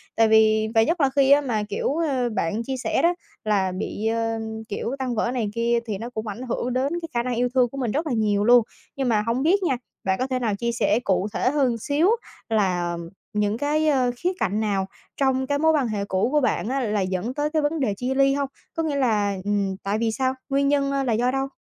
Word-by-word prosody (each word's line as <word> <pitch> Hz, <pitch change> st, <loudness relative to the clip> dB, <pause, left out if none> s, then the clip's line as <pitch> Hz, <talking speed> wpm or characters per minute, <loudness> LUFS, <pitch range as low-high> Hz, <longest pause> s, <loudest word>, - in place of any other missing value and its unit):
Tại 225 Hz, -1 st, +4 dB
vì 220 Hz, 0 st, +4 dB
và 225 Hz, -, +6 dB
nhất 330 Hz, +6 st, 0 dB
là 275 Hz, -, +4 dB
khi 275 Hz, -1 st, +4 dB
á 285 Hz, -, +7 dB
mà, 225 Hz, -7 st, -1 dB
kiểu, 285 Hz, -, -1 dB
ơ, 270 Hz, -7 st, 0 dB
bạn 215 Hz, +1 st, -1 dB
chia 265 Hz, +1 st, -3 dB
sẻ -, -, +1 dB
đó, 345 Hz, +1 st, +4 dB, 0.3 s
là 200 Hz, -3 st, +1 dB
bị, 205 Hz, +3 st, -3 dB
ơm, 225 Hz, 0 st, -1 dB, 0.3 s
kiểu, 235 Hz, +5 st, -3 dB
tan 250 Hz, -3 st, -2 dB
vỡ 235 Hz, +3 st, 0 dB
này 230 Hz, -5 st, -1 dB
kia 235 Hz, 0 st, +2 dB
thì 210 Hz, -3 st, -3 dB
nó 230 Hz, +4 st, -6 dB
cũng 220 Hz, -2 st, -5 dB
ảnh 210 Hz, +4 st, -5 dB
hưởng 245 Hz, +1 st, -2 dB
đến 270 Hz, +5 st, 0 dB
cái 330 Hz, -, -6 dB
khả 235 Hz, 0 st, 0 dB
năng 250 Hz, -1 st, -2 dB
yêu 245 Hz, +1 st, +1 dB
thương 250 Hz, -2 st, +3 dB
của 275 Hz, -, -9 dB
mình 245 Hz, -5 st, -1 dB
rất 310 Hz, +6 st, -1 dB
là 255 Hz, -, -1 dB
nhiều 210 Hz, -2 st, +1 dB
luôn. 240 Hz, 0 st, +6 dB, 0.3 s
Nhưng 265 Hz, -3 st, -1 dB
mà 215 Hz, -2 st, +3 dB
hổng 250 Hz, +4 st, 0 dB
biết 380 Hz, +4 st, +3 dB
nha, 265 Hz, -8 st, +1 dB, 0.3 s
bạn 190 Hz, 0 st, 0 dB
có 255 Hz, -, 0 dB
thể 255 Hz, -1 st, -1 dB
nào 225 Hz, -5 st, 0 dB
chia 235 Hz, +3 st, -1 dB
sẻ 235 Hz, 0 st, +1 dB
cụ 190 Hz, +1 st, +1 dB
thể 255 Hz, -, +1 dB
hơn 280 Hz, -3 st, +2 dB
một -, -, -2 dB
xíu 300 Hz, -, +2 dB, 0.4 s
là 180 Hz, -5 st, 0 dB, 0.4 s
những 210 Hz, +1 st, 0 dB
cái, 300 Hz, +3 st, +1 dB
ơ, 260 Hz, -4 st, +3 dB
khía 360 Hz, +6 st, 0 dB
cạnh 210 Hz, 0 st, 0 dB
nào 200 Hz, -3 st, 0 dB, 0.3 s
trong 265 Hz, -1 st, +1 dB
cái 285 Hz, +1 st, 0 dB
mối 320 Hz, +1 st, +4 dB
quan 285 Hz, -6 st, +1 dB
hệ 205 Hz, -2 st, -2 dB
cũ 190 Hz, +4 st, 0 dB
của 300 Hz, -, +3 dB
bạn 250 Hz, -4 st, 0 dB
á 270 Hz, +1 st, 0 dB
là 210 Hz, -5 st, 0 dB
dẫn 185 Hz, +6 st, -2 dB
tới 295 Hz, +2 st, -1 dB
cái 310 Hz, 0 st, 0 dB
vấn 300 Hz, +2 st, -1 dB
đề 225 Hz, -7 st, +1 dB
chia 255 Hz, +3 st, -1 dB
ly 275 Hz, 0 st, +4 dB
hông? 280 Hz, -1 st, -1 dB, 0.2 s
Có 325 Hz, -, -2 dB
nghĩa 300 Hz, -3 st, -1 dB
là, 210 Hz, -7 st, +1 dB
ừm, 200 Hz, -2 st, 0 dB
tại 200 Hz, +2 st, 0 dB
vì 230 Hz, -1 st, +1 dB
sao? 260 Hz, +3 st, 0 dB, 0.2 s
Nguyên 275 Hz, +1 st, +2 dB
nhân, 280 Hz, -1 st, +2 dB
a, 275 Hz, 0 st, 0 dB
là 240 Hz, -4 st, 0 dB
do 245 Hz, +3 st, +1 dB
đâu? 270 Hz, 0 st, -1 dB
245 Hz, 260 wpm, -24 LUFS, 215-275 Hz, 0.4 s, á